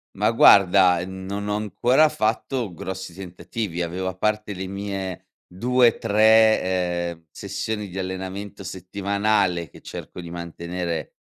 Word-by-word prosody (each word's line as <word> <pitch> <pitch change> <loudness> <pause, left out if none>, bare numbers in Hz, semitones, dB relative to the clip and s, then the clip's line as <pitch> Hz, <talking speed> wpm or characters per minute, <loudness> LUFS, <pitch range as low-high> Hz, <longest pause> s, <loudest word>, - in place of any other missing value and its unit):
Ma, - - +2
guarda, 95 -2 +6
mhmm, 95 0 -8
non 100 +1 -4
ho 105 - 0
ancora 120 - +3
fatto 115 - -1
grossi 95 +1 -6
tentativi, 90 0 -5
avevo 90 +2 -3
a 95 - -3
parte 105 0 -1
le 95 +1 -5
mie 95 -2 -5 0.2
2-3, 110 -5 +3
ehm, 85 -1 -14
sessioni 105 +1 -4
di 95 +2 -6
allenamento 95 +2 -5
settimanale 95 -2 -1
che - - -16
cerco - - -9
di 85 -1 -8
mantenere, 85 -1 -5
95 Hz, 130 wpm, -23 LUFS, 90-105 Hz, 0.2 s, guarda